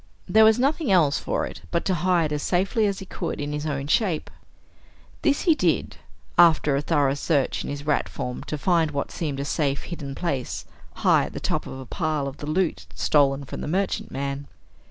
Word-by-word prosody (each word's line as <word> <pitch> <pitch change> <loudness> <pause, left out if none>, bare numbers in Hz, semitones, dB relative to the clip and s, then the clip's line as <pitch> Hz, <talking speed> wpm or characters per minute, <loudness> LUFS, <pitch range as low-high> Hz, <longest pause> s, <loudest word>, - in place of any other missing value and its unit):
There 220 +4 +6
was 220 +1 +6
nothing 275 - +1
else 155 -6 +4
for - - -1
it - - -9
but 170 - -1
to 190 - +2
hide 170 -3 +1
as 150 - -2
safely 195 - +1
as 200 -1 -1
he 195 - -7
could 175 -2 -4
in 145 0 -3
his 150 +1 -3
own 140 -2 -2
shape. 165 +2 0 0.9
This 285 -1 +2
he 335 - +5
did, - - 0 0.4
after 155 -4 +6
a 140 - +1
thorough 145 -3 +2
search 140 -1 0
in - - -5
his 145 0 -5
rat 150 -1 +1
form 125 0 -5
to 150 - -3
find 165 0 +2
what 140 -1 -3
seemed 145 -5 -3
a 140 - -2
safe, 145 -2 -1
hidden 145 -6 -6
place 125 - -3 0.4
high - - +5
at - - -8
the - - -4
top - - -2
of 130 - -7
a 130 - -8
pile 155 -1 -1
of 140 +1 -7
the 145 - -7
loot 155 - 0
stolen 140 - +2
from - - -7
the - - -4
merchantman. 140 -6 -2
150 Hz, 205 wpm, -24 LUFS, 140-180 Hz, 0.9 s, There